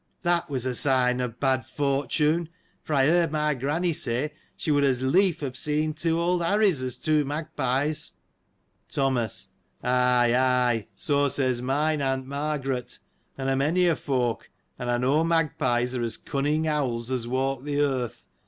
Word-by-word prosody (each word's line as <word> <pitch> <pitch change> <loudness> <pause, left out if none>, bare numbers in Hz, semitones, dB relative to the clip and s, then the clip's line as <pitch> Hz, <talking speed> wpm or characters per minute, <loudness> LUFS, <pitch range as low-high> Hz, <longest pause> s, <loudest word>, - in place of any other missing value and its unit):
That 175 -2 +1
was 130 -3 -2
a 130 - 0
sign 125 -1 +3
of 125 -2 -4
bad 130 -2 +1
fortune: 150 +4 0 0.3
for 155 - -2
I 135 -1 +4
heard 170 +1 +3
my 150 -1 +1
granny 150 +7 -1
say, 140 +2 -1 0.2
she 155 - -1
would 145 -1 +3
as 130 -2 +1
lief 180 +6 +2
have 130 -3 -4
seen 150 +2 0
two 165 +2 0
old 175 +1 +1
Harries, 195 -4 +2
as 130 -2 -3
two 155 -1 +2
magpies. 145 0 -2 0.8
Thomas. 130 -6 -1 0.2
— - - -39
Ay, 125 -1 +3
ay, 125 -4 +2
so 145 -1 +1
says 130 -2 0
mine 145 +4 0
aunt 135 -1 -1
Margaret, 135 -3 -3 0.4
and 135 -1 -3
a 135 - +2
many 160 +7 +2
a 170 -2 +3
folk, 125 -6 -2 0.3
and 125 - -3
I 120 - +2
know 135 +6 +2
magpies 140 -7 +1
are 125 - -1
as 115 -1 -1
cunning 150 +3 -1
owls 130 -5 -1
as 125 -3 -2
walk 130 +1 -1
the 145 0 -2
earth. 130 -5 -1
135 Hz, 165 wpm, -26 LUFS, 125-155 Hz, 0.8 s, I